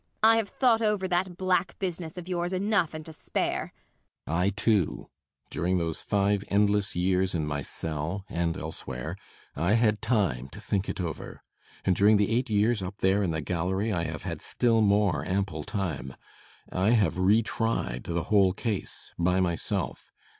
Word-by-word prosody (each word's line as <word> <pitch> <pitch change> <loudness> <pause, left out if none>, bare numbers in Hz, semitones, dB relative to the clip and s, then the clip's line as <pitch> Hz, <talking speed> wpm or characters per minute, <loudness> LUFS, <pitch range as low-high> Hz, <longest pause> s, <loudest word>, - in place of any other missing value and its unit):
I 225 +1 +7
have 220 -3 0
thought 235 -4 +3
over 210 -3 +1
that 180 0 0
black 185 -1 +1
business 175 -3 -4
of 180 -1 -7
yours 175 0 -1
enough 190 -4 +1
and 155 -1 -7
to 160 - -8
spare. - - -2 0.5
BORKMAN. 85 +3 0
I 95 - +3
too. 100 -3 0 0.4
During 90 +2 0
those 85 -2 -2
five 100 0 +1
endless 105 0 +2
years 90 +1 +1
in 80 -2 0
my 75 -1 -2
cell 80 +7 -4
and 85 -1 -1
elsewhere 65 -6 -6 0.4
I 85 +8 +2
had 110 -2 +2
time 95 - 0
to 100 - -9
think 105 -2 -1
it - - -4
over. 85 -4 -5 0.4
And 95 - +3
during 105 +3 +5
the 105 +1 +1
eight 125 +1 0
years 105 +1 +2
up 95 +2 -5
there 95 +2 +2
in 95 - +1
the 80 -1 -1
gallery 95 +6 -1
I 85 -2 0
have 80 -2 -5
had - - -4
still 115 -2 +2
more 100 -7 +3
ample 95 -3 -1
time. 75 -9 -3 0.6
I 95 +5 +2
have 95 -7 +2
re 105 +5 +4
tried 115 - -2
the 85 -1 -1
whole 95 -1 +4
case 105 -1 -4
by 90 +2 +2
myself. 95 +1 -2
100 Hz, 175 wpm, -28 LUFS, 85-115 Hz, 0.6 s, I